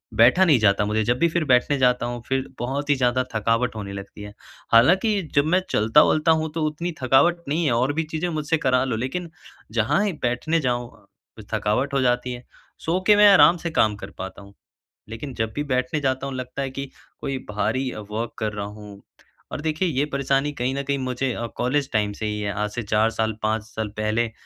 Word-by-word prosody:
बैठा 125 +11 +6
नहीं 150 -8 +4
जाता, 105 -1 +3
मुझे 110 +1 0
जब 120 +3 +1
भी 170 - +4
फिर 170 0 0
बैठने 130 +2 +3
जाता 125 -2 +2
हूँ, 120 -1 -4
फिर 135 0 -1
बहुत 140 +4 -3
ही 145 - +5
ज़्यादा 130 -1 +1
थकावट 115 +3 0
होने 100 -2 -6
लगती 100 +1 -9
है, 105 0 -9 0.4
हालाँकि 190 - +4
जब 140 0 +4
मैं 180 +4 +2
चलता-वलता 150 +8 +4
हूँ, 160 -1 0
तो 165 -1 -2
उतनी 165 +4 -3
थकावट 135 +7 +4
नहीं 160 +3 0
है 145 - +2
और 125 +4 +1
भी 165 +2 -1
चीज़ें 160 +2 -3
मुझसे 155 0 -1
करा 130 -3 +2
लो, 130 -3 -1
लेकिन 135 +10 -4 0.4
जहाँ 120 - +1
ही 200 - -1
बैठने 125 +7 0
जाऊँ, 120 -4 -1 0.6
थकावट 125 +7 0
हो 135 - +2
जाती 125 0 0
है। 125 - -9 0.4
सो 170 +3 +1
के 210 - +7
मैं 210 0 +7
आराम 170 0 +7
से 170 0 -4
काम 110 -8 +2
कर 100 0 -9
पाता 95 +1 -7
हूँ, 100 0 -15 0.6
लेकिन 125 +5 -7
जब 110 0 -2
भी 145 - -1
बैठने 125 +4 0
जाता 130 0 -1
हूँ, 135 - -5
लगता 130 +1 -5
है 135 - -3
कि 135 +1 -6 0.3
कोई 135 -1 -3
भारी 130 +5 -1 0.2
वर्क 115 +2 -3
कर 110 -2 -2
रहा 100 -1 -4
हूँ। 105 -1 -11 0.5
और - - -4
देखिए 155 +3 -1
ये 140 -1 0
परेशानी 140 +1 +1
कहीं 125 -1 -2
न 140 - -2
कहीं 140 0 -1
मुझे 130 0 -2
अ, 115 - -4
कॉलेज 135 +3 0
टाइम 105 -1 +1
से 110 - -5
ही 105 0 -3
है 100 -1 -2
आज 105 +1 -2
से 120 +2 -4
4 110 +1 +2
साल 110 0 0
5 110 0 0
साल 110 0 -5
पहले, 110 +2 0
130 Hz, 215 wpm, -23 LUFS, 110-145 Hz, 0.6 s, के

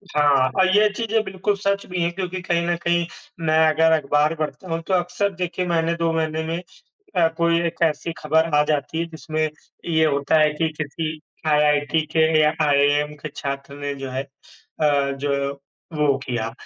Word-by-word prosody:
हाँ, 140 -3 +4
और 185 - +5
ये 210 0 +6
चीज़ें 225 -1 0
बिल्कुल 190 +1 -1
सच 200 0 -1
भी 180 -1 -3
हैं 170 +1 +1
क्योंकि 185 0 -4
कहीं 170 -1 0
न 175 - +1
कहीं 170 0 +2 0.4
मैं 155 0 +3
अगर 160 +1 +3
अखबार 150 0 +2
पढ़ता 160 +4 -5
हूँ, 165 0 -1
तो 190 - -3
अक्सर 180 +3 +1
देखिए 180 0 -2
मैंने 165 -1 +1
2 165 -1 0
महीने 160 0 -1
में 165 +1 -2 0.6
अ, 165 -2 +5
कोई 170 0 +2
एक 170 0 -4
ऐसी 165 +1 -1
खबर 160 +1 +2
आ - - +6
जाती 150 +1 -1
है 170 - -1
जिसमें 155 -1 -3 0.4
ये 160 -1 +3
होता 145 +1 +2
है 150 0 +4
कि 160 +1 0
किसी 155 +1 -4 0.3
आईआईटी 150 0 +3
के 160 - +3 0.2
या 150 0 +4
आईएएम 145 +1 +3
के 155 - -4
छात्र 140 0 -5
ने 145 0 -3
जो 135 -1 -6
है 130 +1 -2
अ, 140 +1 -2
जो 140 0 -2 0.4
वो 145 -2 +3
किया 120 -4 -3
155 Hz, 185 wpm, -22 LUFS, 145-170 Hz, 0.6 s, ये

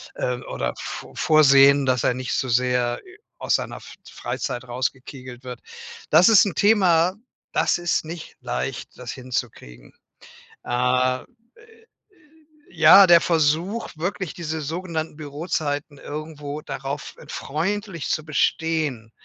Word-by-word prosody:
äh, 125 - -1
oder - - -3
vor - - -8
vorsehen, 140 -2 +5
dass 125 -2 +1
er - - +2
nicht 130 0 -4
so 130 - -1
sehr, 125 0 +1
äh, 370 +2 -16 0.2
aus - - +1
seiner - - -3
F - - -12 0.2
Freizeit 125 +1 -4
rausgekegelt 130 0 -5
wird. 125 -2 -8 0.5
Das 185 - +7
ist 215 -2 +7
'n 195 - -2
Thema, 185 -4 +4 0.4
das - - +2
ist 175 -2 0
nicht 165 0 -8
leicht, 65 +2 -4
das - - -6
hinzukriegen. 115 - -6 0.7
Ähm, 125 +1 +1 0.3
äh, - - -19
äh, 450 +1 -21 0.9
ja, 165 +5 +9
der 170 -1 +7
Versuch, 165 +7 0
wirklich 180 +1 -3
diese 160 -2 -4
sogenannten 160 0 -4
Bürozeiten 145 -1 -3
irgendwo 150 -1 -7
darauf 135 0 -6
freundlich 185 +3 -3
zu 155 - -1
bestehen. 150 -6 -1
150 Hz, 130 wpm, -23 LUFS, 130-170 Hz, 0.9 s, ja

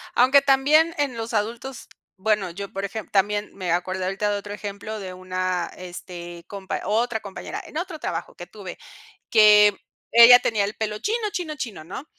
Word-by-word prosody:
Aunque 260 +3 +6
también 290 +4 +4
en 280 -5 -1
los 225 +1 -5
adultos 230 +4 -3 0.3
bueno, 210 -2 +1
yo 200 +4 -6
por 195 - -4
ejem 200 +2 -5
también 205 +1 0
me 185 -3 -3
acordé 185 +2 -1
ahorita 195 +3 -1
de 205 - 0
otro 205 0 -8
ejemplo 210 +1 -6
de 185 -2 -7
una, 185 -1 -3
este, 175 -1 -9
compa 195 -2 -5
otra 225 +1 0
compañera 200 -2 -7
en - - -8
otro 345 -1 -4
trabajo 170 - -5
que 175 - -9
tuve, 190 -2 -10 0.5
que 210 -2 +7 0.4
ella 235 +2 +10
tenía 210 -3 0
el 205 +2 -4
pelo 210 -1 -3
chino 435 0 -1
chino 345 -6 -4
chino, 230 - -6
¿no? 185 - -8
210 Hz, 175 wpm, -23 LUFS, 190-240 Hz, 0.5 s, ella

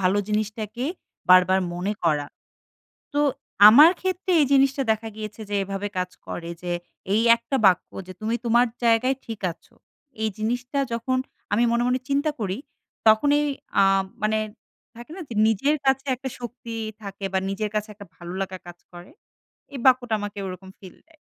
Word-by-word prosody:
ভালো 190 +2 +2
জিনিসটাকে 215 +3 -2 0.4
বার, 185 0 +9
বার 190 0 +3
মনে 190 +4 -2
করা। 150 -3 +1 0.9
তো 290 - +1 0.5
আমার 295 +10 +9
ক্ষেত্রে 375 0 -2
এই 290 - +4
জিনিসটা 275 0 +3
দেখা 220 +1 -2
গিয়েছে 215 0 -7
যে 205 - -1
এভাবে 195 +1 -4
কাজ 180 0 -1 0.2
করে, 170 0 -6
যে 175 -1 -4 0.4
এই 220 - +3
একটা 235 +4 -4
বাক্য 185 -2 +4 0.2
যে 185 - -8
তুমি 225 +2 0
তোমার 240 +1 +4 0.2
জায়গায় 235 +3 +3
ঠিক 225 -2 -6
আছো। - - -20 0.5
এই 220 - +1
জিনিসটা 245 +5 -2
যখন 255 +3 -1 0.4
আমি 230 - +3
মনে, 235 0 +2
মনে 255 +1 +1
চিন্তা 285 +2 +1
করি, 200 -1 -2 0.5
তখনই 290 +7 +5 0.4
আ - - +6 0.4
মানে, 215 0 +2 0.6
থাকে 240 +5 -11
না? 375 - -7
যে 225 - -6
নিজের 245 +8 +2
কাছে 270 0 +2
একটা 265 +1 -6
শক্তি 240 -1 -8 0.3
থাকে 200 0 -7
বা 190 - +2
নিজের 210 +2 -2
কাছে 215 +1 -1
একটা 205 0 -12
ভালো 175 +1 -8
লাগা 190 -1 -4
কাজ 175 0 -10 0.2
করে। 175 +6 -12 0.6
এই 275 - -6
বাক্যটা 250 -3 +4
আমাকে 205 0 -6
ওরকম 190 +1 -8
feel 185 -4 -13
দেয়। 320 - -24
220 Hz, 170 wpm, -24 LUFS, 195-255 Hz, 0.9 s, বার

